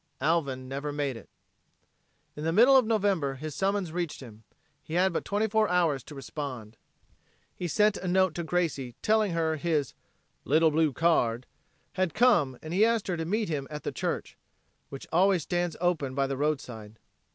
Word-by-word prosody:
Alvin 140 -4 0
never 140 +3 -4
made 145 -3 -2
it. 115 - -12 1.1
In 150 - -6
the 165 - 0
middle 240 +9 +6
of 255 -4 +5
November 195 -11 +1
his 155 +3 -6
summons 195 -1 -1
reached 170 -2 -3
him. 115 -4 -12 0.4
He 160 - -7
had 185 0 +3
but - - -2
twenty 210 +2 0
four 220 0 +2
hours 170 -6 +2
to 150 - -10
respond. 130 -6 -7 0.8
He 180 - -4
sent 210 +6 +2
a 185 - -5
note 185 -1 +3
to 170 - -4
Gracie, 155 -8 -2
telling 215 -3 +2
her 160 -1 0
his 150 -4 -1 0.5
"little 160 +3 +3
blue 155 0 +2
card" 130 -7 +1 0.5
had 185 -2 -1
come 210 - +3
and 160 +1 -6
he 195 +4 +4
asked 230 -1 +2
her 175 - -1
to 160 - -3
meet 210 +5 -1
him 140 -4 -3
at 150 -1 -7
the - - -3
church - - -3 0.5
which 135 - -8
always 180 0 +3
stands 175 -1 -2
open 160 -7 0
by 140 0 +1
the 135 0 -2
roadside. 125 -7 -3
160 Hz, 180 wpm, -28 LUFS, 140-185 Hz, 1.1 s, middle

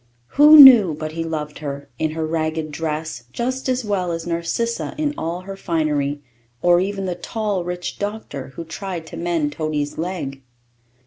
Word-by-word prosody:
Who 300 +2 +8
knew 235 - +10
but 155 0 -5
he 165 +1 -3
loved 150 -2 -5
her, 140 -1 -6
in 155 - +1
her 160 0 -2
ragged 155 -1 -2
dress, 155 -4 -4
just 255 - -3
as 255 -2 0
well 190 -4 -1
as 165 -1 -4
Narcissa 170 +8 -2
in 300 -1 -1
all 170 +2 -4
her 195 +1 -8
finery, 150 -6 -1 0.4
or 175 +2 +4
even 195 +1 -2
the 180 - -1
tall, 200 +1 -3
rich 180 0 -5
doctor, 205 -10 -5
who 170 - -6
tried 175 0 -6
to 165 - -9
mend 165 -3 -1
Toady's 150 -1 -3
leg? 160 -6 -4
170 Hz, 170 wpm, -21 LUFS, 155-195 Hz, 0.4 s, knew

